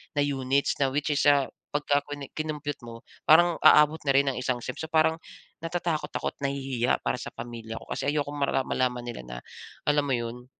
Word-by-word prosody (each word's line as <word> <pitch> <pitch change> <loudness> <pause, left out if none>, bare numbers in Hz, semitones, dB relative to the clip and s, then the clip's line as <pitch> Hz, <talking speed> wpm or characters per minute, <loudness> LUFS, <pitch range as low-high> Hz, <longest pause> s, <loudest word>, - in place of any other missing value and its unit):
na 145 - +2
units 140 0 0
na, 135 - +3
which 150 +1 0
is, 145 - +1
ah, 140 -2 +4 0.2
pagkakwene 145 -1 -1
kinompyut 150 -2 -3
mo, 115 0 -9 0.3
parang 170 +2 +6
aabot 150 +1 +6
na 135 - +4
rin 140 0 +4
ng 130 - -3
isang 125 -1 -1
sem. - - -5
So 160 - -4
parang 160 0 +3 0.4
natatakot 165 -1 -2
ako - - -2
at - - -42
nahihiya 135 -3 -1
para - - 0
sa - - -7
pamilya 115 -1 -7
ko - - -12
kasi - - -2
ayokong 145 -1 -2
mara 140 -1 +1
malaman 125 -2 -1
nila 120 - -6
na, - - -7 0.5
alam 145 0 +3
mo 135 - +1
'yon, 120 +1 -5
140 Hz, 200 wpm, -27 LUFS, 125-150 Hz, 0.5 s, parang